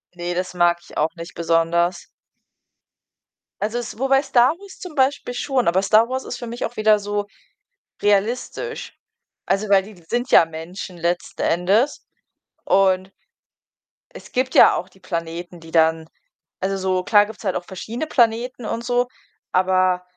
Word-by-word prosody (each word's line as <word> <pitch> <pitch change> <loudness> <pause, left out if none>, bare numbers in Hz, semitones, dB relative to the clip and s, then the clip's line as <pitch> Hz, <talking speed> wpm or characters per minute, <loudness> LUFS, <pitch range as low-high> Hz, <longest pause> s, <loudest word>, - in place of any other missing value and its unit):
Ne, 175 0 -3
das 180 0 -3
mag 175 0 +3
ich - - -13
auch 155 +4 0
nicht 170 +1 -9
besonders. 170 +1 +1 1.6
Also 215 +3 -1
es 235 -1 -6
wobei 270 0 +3
„Star 260 -2 +4
Wars“ 400 -1 -13
zum 350 -4 -9
Beispiel 265 -2 +1
schon, 255 -3 0
aber 185 +3 +3
„Star 215 +3 +4
Wars“ 260 0 -2
ist 245 - -6
für 240 - -7
mich 235 +1 -4
auch 240 - -7
wieder 215 0 +5
so 205 0 -3 0.7
realistisch. 230 - -1 0.5
Also, 195 +2 0
weil 195 -1 +5
die 200 -4 -14
sind 245 +2 -1
ja 165 - +7
Menschen 170 +3 -8
letzten 175 +2 -2
Endes 200 - +1 0.6
und 190 -1 +2 1.0
es - - -12
gibt 255 +1 -1
ja - - +8
auch 185 - -4
die 190 - -23
Planeten, 170 0 -5
die 165 0 -13
dann 160 -1 +2 0.5
also 195 +1 -1
so, 185 -1 0
klar 205 0 +5
gibt's 220 +1 -11
halt 190 - -1
auch 180 - -2
verschiedene 230 +10 -5
Planeten 240 -1 +1
und 230 +2 -3
so, 245 0 +1 0.5
aber 185 -1 +2
195 Hz, 160 wpm, -21 LUFS, 175-240 Hz, 1.6 s, ja